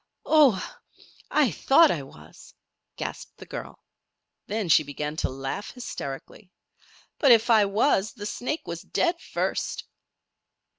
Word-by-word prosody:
"Oh! 295 -8 +6 0.7
I 305 - +3
I - - -6
thought 285 - +5
I 155 - -2
was," 80 - -15 0.4
gasped - - -7
the - - -11
girl. - - -8 0.6
Then 210 -1 -2
she 160 - +6
began 150 +1 -5
to - - -1
laugh 135 +9 -5
hysterically. 185 - -8 0.7
"But 275 - +5
if 235 +1 +5
I 215 -2 +6
was 205 0 +1
the 205 -4 -8
snake 255 +8 -3
was 170 0 -6
dead 345 0 -1
first." - - -2
210 Hz, 135 wpm, -26 LUFS, -, 0.7 s, Oh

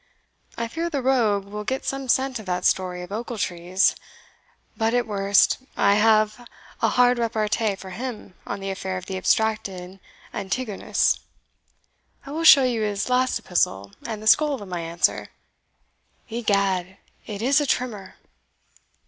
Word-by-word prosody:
I 230 - -2
fear 330 +8 -3
the 280 -5 -3
rogue 225 -7 +2
will 210 +1 -6
get 265 +5 -3
some 270 -1 -3
scent 260 -1 +1
of 215 - -11
that 180 0 -2
story 180 -1 +1
of 180 - -11
Ochiltree's 195 -5 0 0.8
but 225 +1 0
at 245 - +2
worst, 200 -1 +3 0.2
I 200 - +4
have 215 +2 +2 0.3
a - - +3
hard 245 0 +3
repartee 220 -2 0
for 190 -1 -10
him 235 -4 -6
on - - -4
the 195 0 -3
affair 190 -1 -4
of 180 - -7
the 190 - -5
abstracted 195 -2 -1 0.3
Antigonus 205 +2 0 1.1
I 280 - -8
will 320 +3 -3
show 280 -4 +9
you 245 -3 0
his 210 +1 -2
last 255 +1 +2
epistle 100 - -1
and 215 -2 -5
the - - -9
scroll 290 +4 +4
of 205 - -9
my 180 -1 -4
answer 170 +1 0 1.0
egad, 200 -5 0 0.3
it 210 0 -5
is 275 +4 +4
a 290 - -1
trimmer!" 215 -8 -2
215 Hz, 150 wpm, -24 LUFS, 190-245 Hz, 1.1 s, show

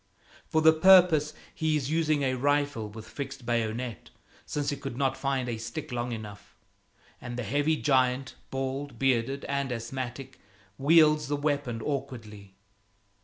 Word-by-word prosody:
For 160 0 +2
the 160 0 +8
purpose 165 -3 +6 0.2
he 155 -1 0
is 140 0 -3
using 155 -3 +1
a 130 -1 +1
rifle 140 -4 0
with 110 +1 -10
fixed 135 +3 -7
bayonet, 120 0 -2 0.4
since 145 -1 -1
he - - -2
could 120 - -7
not 135 -1 +1
find 135 -1 -1
a 115 -2 -3
stick 115 +6 -6
long 120 0 -2
enough; 105 -3 -8 0.7
and 120 -1 -6
the 125 - -2
heavy 145 +8 +1
giant, 130 -2 +1 0.2
bald, 135 +2 -4
bearded 135 +1 0
and 140 -2 -2
asthmatic, 125 +2 -5 0.4
wields 150 0 +5
the 145 - 0
weapon 145 -6 -1
awkwardly. 110 -9 -5
135 Hz, 145 wpm, -28 LUFS, 120-145 Hz, 0.7 s, the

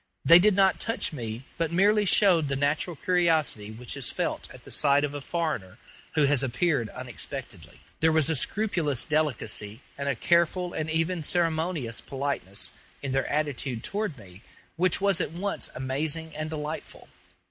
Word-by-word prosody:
They 170 +2 +9
did 205 +1 +4
not 195 -1 +4
touch 225 -5 -1
me, 115 -3 -5 0.2
but 165 -1 0
merely 205 +4 +3
showed 180 -6 +5
the 140 - -1
natural 145 +5 0
curiosity 165 - +1
which 115 +2 -7
is - - -2
felt - - -2
at - - -13
the - - -11
sight 145 -1 +3
of 145 -1 -2
a 145 - -5
foreigner 155 - -3 0.4
who 150 - +4
has 140 -2 +4
appeared 130 -2 0
unexpectedly. - - -8 0.2
There 160 0 +4
was 155 -3 +3
a 160 - +2
scrupulous 160 - 0
delicacy 135 -7 0 0.2
and 140 0 -1
a - - 0
careful 175 +1 +1
and 155 0 -3
even 165 +2 0
ceremonious 160 -6 0
politeness 135 -8 -2 0.3
in 135 - -2
their 135 +1 0
attitude 140 -5 -1
toward 205 -7 -3
me 95 -3 -14 0.3
which 180 +1 +2
was 200 -3 +3
at 155 - -2
once 195 +4 -2
amazing 150 +5 -2
and 155 0 -4
delightful. 155 0 -6
155 Hz, 165 wpm, -27 LUFS, 135-175 Hz, 0.4 s, They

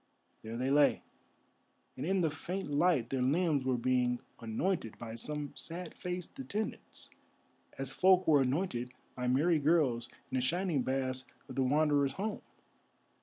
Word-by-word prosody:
There 115 +1 -6
they 130 +2 0
lay, 145 0 +4 0.9
and 130 - -5
in 190 0 +2
the 160 -3 +2
faint 175 +2 -4
light 145 -5 +2
their 135 -1 0
limbs 145 +1 +2
were 130 -1 +2
being 125 0 +1 0.2
anointed 115 - -2
by 115 -1 -7
some 145 +5 -3
sad 170 0 -6
faced 180 +6 -6
attendants, 220 -5 -5 0.7
as 135 -1 -4
folk 185 +5 +4
were 150 -3 +6
anointed 130 -3 -1 0.2
by 125 0 -3
merry 155 +6 +3
girls 140 -6 +2 0.2
in 130 - 0
the - - +1
shining 170 +1 +1
baths 130 0 -1 0.2
of 130 - -8
the 135 - 0
Wanderer's 145 0 +3
home. 205 +6 -3
140 Hz, 150 wpm, -33 LUFS, 130-175 Hz, 0.9 s, were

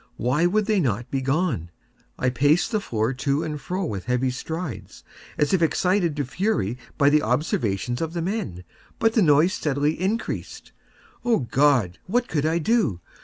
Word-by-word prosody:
Why 145 +8 +2
would 210 +3 +1
they 210 -1 +2
not 120 - -1
be 135 - -1
gone? 135 - 0 0.5
I 125 - +1
paced 145 - +2
the 215 -2 0
floor 115 - -1
to 140 +4 0
and 150 -3 -4
fro 185 +1 -3
with 100 - -4
heavy 125 +1 +1
strides, 160 +2 -6 0.3
as 150 +3 +1
if 185 - +3
excited 175 0 +2
to 145 -2 -1
fury 125 - -1 0.2
by 140 -1 +4
the 150 0 +4
observations 120 - -1
of 165 0 -2
the 170 - -2
men—but 185 - -3
the 225 - +3
noise 155 +2 +4
steadily 150 +1 -1
increased. 210 +5 -3 0.5
Oh 235 -7 +2
God! 125 -7 +2
what 240 +5 +1
could 155 -5 0
I 165 +1 +1
do? 170 - +1
150 Hz, 170 wpm, -24 LUFS, 125-180 Hz, 0.5 s, by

